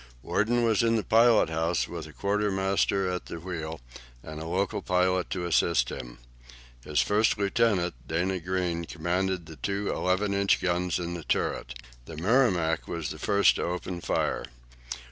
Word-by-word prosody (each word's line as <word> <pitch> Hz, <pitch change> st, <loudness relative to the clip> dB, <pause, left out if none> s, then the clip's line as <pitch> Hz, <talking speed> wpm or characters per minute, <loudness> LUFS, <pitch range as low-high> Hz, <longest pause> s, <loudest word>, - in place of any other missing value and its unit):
Worden 120 Hz, +4 st, +1 dB
was 110 Hz, -3 st, +3 dB
in 115 Hz, 0 st, +2 dB
the 110 Hz, -, 0 dB
pilot 115 Hz, -6 st, +4 dB
house 80 Hz, +1 st, 0 dB
with 85 Hz, -2 st, -7 dB
a -, -, -12 dB
quartermaster 100 Hz, 0 st, 0 dB
at 90 Hz, -, -4 dB
the 85 Hz, -, -6 dB
wheel, 80 Hz, -3 st, -5 dB, 0.4 s
and 80 Hz, 0 st, -7 dB
a 80 Hz, -, -6 dB
local 95 Hz, +4 st, -1 dB
pilot 90 Hz, 0 st, +1 dB
to 90 Hz, -2 st, -3 dB
assist 85 Hz, -6 st, +2 dB
him. -, -, -7 dB, 0.7 s
His 75 Hz, +1 st, +1 dB
first 105 Hz, +2 st, +2 dB
lieutenant, 100 Hz, -3 st, +1 dB
Dana 90 Hz, +3 st, 0 dB
Greene, 90 Hz, -1 st, -2 dB
commanded 90 Hz, +2 st, -2 dB
the 80 Hz, -1 st, -11 dB
two 100 Hz, +8 st, -2 dB
11 95 Hz, +2 st, 0 dB
inch 100 Hz, 0 st, +2 dB
guns 90 Hz, 0 st, 0 dB
in 85 Hz, -1 st, -4 dB
the 85 Hz, -2 st, -6 dB
turret. -, -, -1 dB, 0.3 s
The 80 Hz, -, -9 dB
"Merrimac" 90 Hz, -4 st, +2 dB
was 80 Hz, -3 st, -4 dB
the 75 Hz, -, -8 dB
first 100 Hz, -3 st, +3 dB
to -, -, -2 dB
open 90 Hz, 0 st, -4 dB
fire. -, -, -1 dB
90 Hz, 165 wpm, -27 LUFS, 85-100 Hz, 0.7 s, pilot